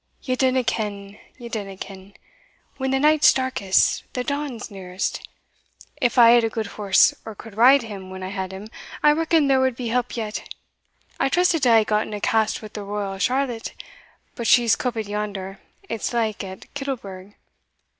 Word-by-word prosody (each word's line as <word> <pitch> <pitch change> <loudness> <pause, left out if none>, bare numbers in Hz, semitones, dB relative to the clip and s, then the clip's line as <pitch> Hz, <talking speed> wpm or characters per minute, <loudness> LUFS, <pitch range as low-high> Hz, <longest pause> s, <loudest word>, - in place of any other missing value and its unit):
"Ye 255 -2 -1
dinna 260 0 +2
ken 205 -3 -4 0.2
ye 240 -2 -9
dinna 200 -4 -5
ken: 195 0 -10 0.6
when 265 -1 -2
the 270 - +2
night's 300 +1 +6
darkest, 260 -8 +1
the 250 - -2
dawn's 280 -6 -4
nearest. 185 -1 -4 0.7
If 255 -3 0
I 235 -1 +8
had 240 -1 +5
a 225 - +1
gude 220 0 -3
horse, 200 -3 +4
or 220 - -8
could 220 0 -12
ride 255 +4 +6
him 200 -4 -8
when 190 0 -8
I 185 - -4
had 190 -1 -4
him, 195 +3 -9 0.3
I 295 - +7
reckon 320 0 +2
there 270 -1 +3
wad 260 -2 +1
be 240 -1 -4
help 245 +1 -1
yet. 215 -2 -5 0.7
I - - +2
trusted 350 0 +2
to 255 - +4
hae 225 -1 +6
gotten 210 0 -1
a - - -5
cast 220 +1 0
wi' 215 - -7
the 210 0 -7
Royal 200 -1 -4
Charlotte, 250 0 -1 0.6
but 235 -4 -4
she's 235 -1 +5
coupit 225 -4 -3
yonder, 200 -2 -4 0.3
it's 225 - -3
like, 220 -4 -1
at 190 -1 -10
Kittlebrig. 205 -9 -6
225 Hz, 175 wpm, -23 LUFS, 200-255 Hz, 0.7 s, I